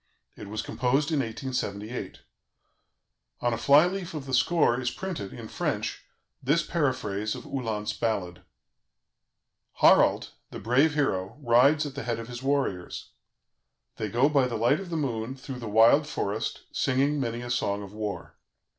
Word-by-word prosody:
It -, -, -9 dB
was 110 Hz, +2 st, -4 dB
composed 135 Hz, +5 st, 0 dB
in 155 Hz, -, +1 dB
1878. 115 Hz, -2 st, -4 dB, 1.2 s
On 120 Hz, -1 st, 0 dB
a -, -, -1 dB
fly 145 Hz, +4 st, +6 dB
leaf 180 Hz, -2 st, -4 dB
of 145 Hz, -3 st, -5 dB
the 135 Hz, -, -6 dB
score 130 Hz, -2 st, +3 dB
is 125 Hz, -, 0 dB
printed, 160 Hz, -, -5 dB
in -, -, -8 dB
French, -, -, -3 dB, 0.4 s
this 150 Hz, +6 st, +2 dB
paraphrase 120 Hz, -, -1 dB
of -, -, -8 dB
Uhland's 110 Hz, -5 st, -3 dB
ballad: 100 Hz, -5 st, -2 dB, 1.3 s
"Harald, -, -, +4 dB, 0.2 s
the -, -, -8 dB
brave 135 Hz, +8 st, +2 dB
hero, 95 Hz, -10 st, -1 dB
rides 140 Hz, +4 st, +4 dB
at 145 Hz, -, -6 dB
the 140 Hz, -, -5 dB
head 120 Hz, -3 st, -2 dB
of 115 Hz, +1 st, -7 dB
his 120 Hz, 0 st, -7 dB
warriors. 135 Hz, -10 st, -2 dB, 0.9 s
They 110 Hz, -, -3 dB
go 120 Hz, +6 st, +3 dB
by 140 Hz, -4 st, +3 dB
the 120 Hz, -2 st, -3 dB
light 120 Hz, +6 st, +3 dB
of 195 Hz, -2 st, -7 dB
the 165 Hz, -, -2 dB
moon 125 Hz, -4 st, -2 dB
through 130 Hz, -1 st, -8 dB
the 115 Hz, -3 st, -6 dB
wild 115 Hz, +8 st, +5 dB
forest, 110 Hz, -5 st, -3 dB
singing 140 Hz, +2 st, +1 dB
many 120 Hz, -2 st, -2 dB
a 120 Hz, 0 st, -5 dB
song 100 Hz, -4 st, -1 dB
of 100 Hz, 0 st, -10 dB
war. 105 Hz, -4 st, -5 dB
125 Hz, 160 wpm, -27 LUFS, 110-140 Hz, 1.3 s, fly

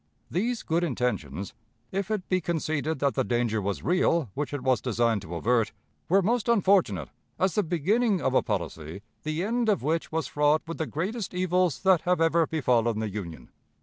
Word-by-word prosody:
These 230 Hz, +7 st, -1 dB
good 165 Hz, +2 st, 0 dB
intentions, 100 Hz, -, -2 dB, 0.4 s
if 195 Hz, +1 st, -2 dB
it 210 Hz, -4 st, -2 dB
be 185 Hz, -1 st, +1 dB
conceded 155 Hz, -2 st, -1 dB
that 140 Hz, 0 st, +1 dB
the 130 Hz, -, +1 dB
danger 120 Hz, -3 st, 0 dB
was 100 Hz, 0 st, -3 dB
real 170 Hz, -, +2 dB
which 145 Hz, 0 st, -3 dB
it 145 Hz, -3 st, -4 dB
was 130 Hz, -1 st, +2 dB
designed 115 Hz, -3 st, +1 dB
to 85 Hz, 0 st, -7 dB
avert, 115 Hz, +4 st, +1 dB, 0.4 s
were 195 Hz, +3 st, +4 dB
most 235 Hz, +3 st, +1 dB
unfortunate 185 Hz, -, +3 dB, 0.3 s
as 190 Hz, +1 st, +1 dB
the 210 Hz, -, +2 dB
beginning 195 Hz, -, +1 dB
of 130 Hz, -, 0 dB
a -, -, +4 dB
policy 90 Hz, -4 st, -4 dB, 0.2 s
the 155 Hz, +3 st, -2 dB
end 230 Hz, +2 st, 0 dB
of 205 Hz, -, +1 dB
which 160 Hz, +3 st, -1 dB
was 160 Hz, -1 st, -1 dB
fraught 150 Hz, +1 st, +2 dB
with 165 Hz, 0 st, -6 dB
the 160 Hz, -, -1 dB
greatest 185 Hz, -, -3 dB
evils 180 Hz, -2 st, +1 dB
that 190 Hz, -3 st, +5 dB
have 180 Hz, -1 st, +1 dB
ever 165 Hz, 0 st, +3 dB
befallen 120 Hz, -7 st, +1 dB
the 110 Hz, -1 st, -2 dB
Union. 90 Hz, -5 st, -7 dB
155 Hz, 185 wpm, -27 LUFS, 120-185 Hz, 0.4 s, that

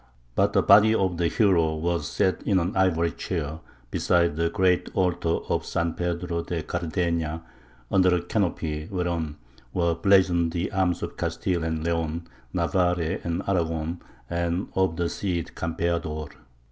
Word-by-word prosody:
But -, -, +2 dB
the -, -, +3 dB
body 110 Hz, +1 st, +7 dB
of 95 Hz, -4 st, +1 dB
the 85 Hz, 0 st, +2 dB
hero 85 Hz, -6 st, +3 dB
was 85 Hz, -1 st, -1 dB
set 95 Hz, -, 0 dB
in 100 Hz, -, +2 dB
an 90 Hz, +2 st, 0 dB
ivory 85 Hz, -3 st, +2 dB
chair 80 Hz, -2 st, -4 dB, 0.3 s
beside 85 Hz, -3 st, +2 dB
the 85 Hz, +1 st, +1 dB
great 90 Hz, 0 st, +2 dB
altar 90 Hz, -2 st, +1 dB
of -, -, 0 dB
San 85 Hz, -1 st, -1 dB
Pedro 85 Hz, -1 st, -2 dB
de 85 Hz, -1 st, -3 dB
Cardeña, 85 Hz, -1 st, -2 dB, 0.5 s
under 90 Hz, -2 st, +4 dB
a 90 Hz, -, 0 dB
canopy 80 Hz, -6 st, -1 dB
whereon 85 Hz, -5 st, -2 dB, 0.4 s
were 85 Hz, -2 st, +2 dB
blazoned 85 Hz, -2 st, +3 dB
the 85 Hz, +1 st, -2 dB
arms 95 Hz, -3 st, 0 dB
of -, -, -5 dB
Castile 90 Hz, -3 st, -1 dB
and 80 Hz, -1 st, -2 dB
Leon, 85 Hz, 0 st, -1 dB, 0.3 s
Navarre 90 Hz, -3 st, +1 dB
and 85 Hz, +2 st, -2 dB
Aragon, 85 Hz, -2 st, -1 dB, 0.3 s
and 85 Hz, +3 st, -1 dB
of 95 Hz, -3 st, +1 dB
the 85 Hz, 0 st, 0 dB
Cid 85 Hz, -2 st, -3 dB
Campeador. 85 Hz, -2 st, -2 dB
85 Hz, 145 wpm, -26 LUFS, 80-90 Hz, 0.5 s, body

